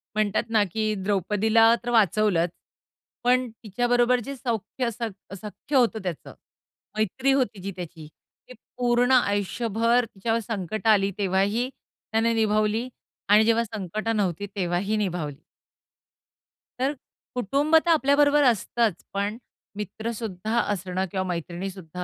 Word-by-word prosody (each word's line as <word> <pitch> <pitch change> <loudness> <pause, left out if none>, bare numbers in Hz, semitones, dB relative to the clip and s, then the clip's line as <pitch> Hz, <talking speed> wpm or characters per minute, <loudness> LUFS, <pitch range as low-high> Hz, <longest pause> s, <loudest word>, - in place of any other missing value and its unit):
म्हणतात 215 0 +1
ना, 220 -2 +4
की 215 +3 -1
द्रौपदीला 210 +4 +3
तर 240 - -3
वाचवलंच. 205 -5 +3 0.7
पण 250 0 +3
तिच्याबरोबर 245 +3 +2
जे 275 - -5
सौख्य 235 0 -2
सख 220 -4 -7
सख्य 210 +8 -6
होतं 235 -4 +3
त्याचं, 180 -5 -5 0.6
मैत्री 235 +6 +1
होती 250 -7 +1
जी 200 - -4
त्याची, 170 -3 -8 0.4
ती - - -11 0.2
पूर्ण 245 +1 +2
आयुष्यभर 230 +1 +2
तिच्यावर 225 +2 -2
संकटं 215 +1 -2
आली 200 -2 +4
तेव्हाही 200 +5 +1
त्याने 230 -3 -3
निभावली 215 +1 +1 0.4
आणि 210 +1 +7
जेव्हा 230 +1 +3
संकटं 215 +1 -3
नव्हती 195 -1 -1
तेव्हाही 190 +3 0
निभावली. 175 -8 -3 1.4
तर 270 +3 +1 0.4
कुटुंब 275 +7 +1
तर - - 0
आपल्याबरोबर 290 -1 +4
असतंच 230 -3 +1
पण, 200 +3 -1 0.4
मित्रसुद्धा 220 +1 -3
असणं 185 0 -2
किंवा 190 -1 -1
मैत्रिणीसुद्धा 180 0 -5
215 Hz, 115 wpm, -25 LUFS, 195-240 Hz, 1.4 s, आणि